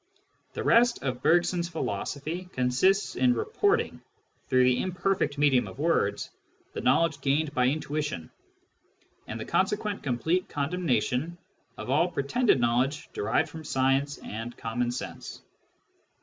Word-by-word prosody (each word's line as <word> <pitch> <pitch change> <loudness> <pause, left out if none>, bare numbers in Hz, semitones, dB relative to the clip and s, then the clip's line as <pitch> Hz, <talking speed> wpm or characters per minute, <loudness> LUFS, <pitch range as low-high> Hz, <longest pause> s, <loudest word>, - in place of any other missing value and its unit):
The - - -4
rest 240 +1 +4
of 130 -2 -2
Bergson's 175 0 +2
philosophy 165 +1 -4
consists 130 +11 +2
in 250 -1 +3
reporting, 440 +1 0 0.5
through 130 -1 +4
the 125 0 +3
imperfect 185 -4 -1
medium 140 -4 +3
of - - -10
words, 140 -10 0 0.4
the - - -4
knowledge 145 +3 +2
gained 145 +2 +1
by 125 -2 +2
intuition, 145 - -2 1.0
and 110 - -5
the 110 - -5
consequent 205 +2 0
complete 160 +8 -1
condemnation 145 0 -1 0.4
of - - -5
all 155 +6 +3
the 175 - -11
pretended 155 - +2
knowledge 125 +5 0
derived 105 - 0
from 160 -1 -9
science 135 +1 +1
and 115 +3 -7
common 120 +2 -2
sense. 125 - -7
145 Hz, 130 wpm, -27 LUFS, 125-180 Hz, 1.0 s, rest